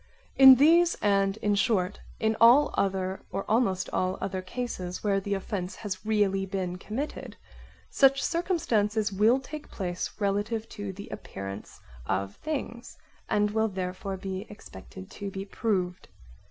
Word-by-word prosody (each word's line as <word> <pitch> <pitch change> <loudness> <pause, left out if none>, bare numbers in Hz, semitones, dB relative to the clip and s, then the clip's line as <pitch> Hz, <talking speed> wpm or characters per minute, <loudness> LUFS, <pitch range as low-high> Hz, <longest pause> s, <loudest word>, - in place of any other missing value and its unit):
In 265 -1 +10
these 335 +6 +5
and, 195 -1 +2
in 210 - +2
short, 200 -2 +1 0.2
in 220 0 +1
all 250 +6 +7
other 190 -1 -1
or 195 - -3
almost 205 -5 +1
all 185 +1 0
other 190 -1 -3
cases 185 -3 -5
where 200 -2 +2
the 200 +1 -2
offence 185 -1 -4
has 190 -3 -6
really 205 -3 +1
been 185 -2 -3
committed, 250 +10 -5 0.5
some 275 -1 +5
circumstances 225 - 0
will 220 +6 +4
take 295 +3 -9
place 180 -2 -3
relative 205 +2 -1
to 205 -2 -6
the 200 +2 -9
appearance 100 +1 -8 0.3
of 100 +1 -1
things, 265 -6 -5 0.3
and 210 0 +2
will 220 +1 +1
therefore 190 0 -4
be 190 +1 -5
expected 95 - -12
to 200 - -6
be 195 0 -6
proved. 185 -4 -2
200 Hz, 140 wpm, -28 LUFS, 185-225 Hz, 0.5 s, In